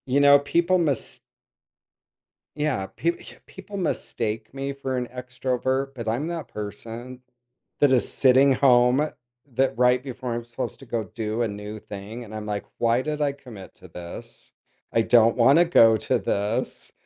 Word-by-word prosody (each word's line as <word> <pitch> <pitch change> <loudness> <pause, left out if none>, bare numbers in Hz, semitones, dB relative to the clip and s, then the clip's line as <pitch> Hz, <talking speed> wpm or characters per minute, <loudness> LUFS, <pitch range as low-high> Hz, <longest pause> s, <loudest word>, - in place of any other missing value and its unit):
You 135 +2 +2
know, 145 0 +7
people 170 +5 +2
mis 145 -7 -1 1.4
Yeah, 150 -10 -1
p 170 - +2 0.3
people 195 +2 -10
mistake 110 - -3
me 135 0 -4
for 135 -1 -3
an 125 -1 -2
extrovert, 130 +2 -2
but 115 -3 -6
I'm 120 +8 -1
that 170 -2 -4
person 115 +4 -7 0.6
that 145 -2 +4
is 130 -2 +2
sitting 135 +1 +5
home 125 +2 +4 0.5
that 130 -1 +1
right 125 0 +4
before 130 -2 -5
I'm 120 0 -4
supposed 120 +2 -5
to 135 - -12
go 115 -1 -2
do 110 +3 -3
a - - +1
new 105 +1 -7
thing, 105 +4 -8
and 110 -2 -11
I'm 110 -1 -5
like, 105 -1 -3
"Why 115 +1 +2
did 150 +1 -3
I 145 -1 +1
commit 125 -9 -12
to 95 - -15
this? 85 0 -9 0.4
I 115 - +3
don't 115 0 +4
wanna 135 +8 +6
go 115 -10 +6
to - - 0
this." 105 +5 -2
125 Hz, 160 wpm, -24 LUFS, 110-140 Hz, 1.4 s, know